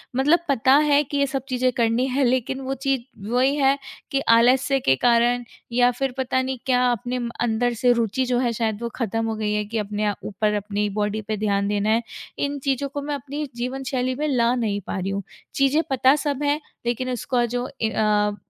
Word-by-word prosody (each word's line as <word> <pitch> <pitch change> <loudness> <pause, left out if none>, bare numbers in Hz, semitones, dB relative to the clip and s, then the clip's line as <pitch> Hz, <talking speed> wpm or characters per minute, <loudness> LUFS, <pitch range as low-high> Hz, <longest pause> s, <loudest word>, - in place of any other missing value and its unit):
मतलब 295 +6 +4
पता 260 -1 +4
है 295 -1 +4
कि 285 +1 -4
ये 280 0 +2
सब 270 -1 -3
चीज़ें 255 0 +1
करनी 235 +1 +2
है, 270 +2 0
लेकिन 260 +1 0
वो 265 0 -3
चीज़ 270 -2 +1 0.3
वही 255 +4 +2
है 275 -1 +3 0.3
कि 275 - +1
आलस्य 255 +4 +4
के 135 - +3
कारण 240 - +3 0.3
या 245 +1 +4
फिर 265 +2 -2
पता 260 0 0
नहीं 260 0 -3
क्या, 250 -1 +3
अपने 245 +2 -2 0.2
अंदर 240 +1 +1
से 250 - +5
रूचि 235 +2 0
जो 245 -1 +1
है, 245 -2 +1
शायद 220 -1 -2
वो 235 - -2
ख़त्म 225 -1 -1
हो 225 - -2
गई 215 -1 -1
है 210 0 -1
कि 225 +2 -4
अपने 210 0 -2
अ, 205 - +1
ऊपर 210 +1 -1
अपनी 205 0 -1
बॉडी 210 +1 -1
पे 215 -1 -2
ध्यान 200 -1 0
देना 205 +1 0
है। 225 +2 +2 0.4
इन 285 0 -1
चीज़ों 275 0 0
को 285 +1 -5
मैं 290 +1 -3
अपनी 285 +2 -5
जीवन 255 +3 -4
शैली 255 0 0
में 300 +3 -1
ला 240 -4 +2
नहीं 215 -5 -1
पा - - -3
रही 190 +1 -2
हूँ। 200 0 -3 0.3
चीज़ें 280 +1 +3
पता 265 +1 +4
सब 285 0 -1
हैं, 290 +1 +1 0.3
लेकिन 245 +2 -1
उसका 245 0 0
जो 245 +1 -2
ए 220 - +2
अ, 210 -1 +1
245 Hz, 215 wpm, -23 LUFS, 220-270 Hz, 0.4 s, से